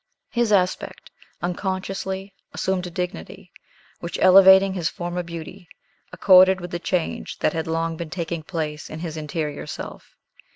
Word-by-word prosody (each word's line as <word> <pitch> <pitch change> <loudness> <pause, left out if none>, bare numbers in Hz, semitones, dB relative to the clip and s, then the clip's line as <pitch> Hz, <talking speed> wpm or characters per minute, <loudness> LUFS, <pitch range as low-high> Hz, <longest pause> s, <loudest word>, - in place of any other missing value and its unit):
His 235 -2 +1
aspect 185 -3 0 0.3
unconsciously 190 +1 -3 0.2
assumed 185 -1 -1
a - - -6
dignity, 175 - -6 0.5
which, 170 - -5
elevating 190 +1 +7
his 170 -3 -1
former 175 -1 -4
beauty, 170 +2 -9 0.4
accorded 185 0 +6
with 175 0 -8
the 175 - -3
change 175 -1 -2
that - - 0
had 160 0 -3
long 165 0 -1
been 170 -1 -6
taking 170 -1 -4
place 155 -2 -5
in 155 +1 -7
his 165 -3 -5
interior 150 -1 -4
self. - - -8
175 Hz, 140 wpm, -23 LUFS, 165-190 Hz, 0.5 s, elevating